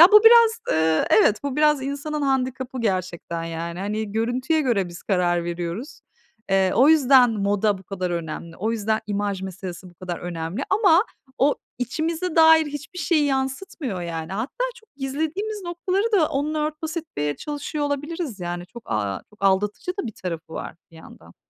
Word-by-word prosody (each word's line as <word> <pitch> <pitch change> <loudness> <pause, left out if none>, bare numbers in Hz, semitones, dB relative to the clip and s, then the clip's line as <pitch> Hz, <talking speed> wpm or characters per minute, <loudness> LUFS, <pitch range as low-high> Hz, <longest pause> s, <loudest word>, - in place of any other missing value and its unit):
Ya, 340 - +12
bu 425 +1 +8
biraz, 460 0 +7
eee, 160 0 +2
evet 215 0 +5
bu 280 0 -2
biraz 300 -2 +3
insanın 285 +2 -3
handikabı 260 -1 -1
gerçekten 185 -5 -2
yani. 165 +1 -5
Hani 210 +1 -3
görüntüye 250 +8 +1
göre 230 -10 +1
biz 175 0 -10
karar 175 -3 +1
veriyoruz. 175 - -5 0.5
Eee, 190 -1 +3
o 265 +5 +6
yüzden 270 -5 +6
moda 205 -1 +1
bu - - -14
kadar 185 -1 -4
önemli. 165 -1 -5
O 220 +4 -1
yüzden, 220 -1 0
imaj 205 -2 -2
meselesi 185 -1 -7
bu - - -23
kadar 175 0 -5
önemli 175 +6 -4
ama 385 -2 +5 0.3
o 285 +2 +4 0.2
içimize 320 +7 -2
dair 320 -1 +7
hiçbir 295 +5 -7
şeyi 320 -3 +2
yansıtmıyor 265 - -2
yani. 165 0 -5
Hatta, 250 - -2
çok 445 -10 -21
gizlediğimiz 320 +10 -3
noktaları 370 +5 -1
da 330 -7 +4
onunla 305 +1 -1
örtbas 310 +2 -5
etmeye 150 - -3
çalışıyor 295 0 -4
olabiliriz 290 - -3
yani 175 0 -4
çok, 235 +5 -11
aaa, 100 -2 -1
çok 210 -1 -9
aldatıcı 205 - +1
da - - -5
bir 220 - -5
tarafı 165 -4 -6
var - - -6 0.2
bir 165 - -16
yandan. 85 - -15
235 Hz, 170 wpm, -23 LUFS, 180-305 Hz, 0.5 s, Ya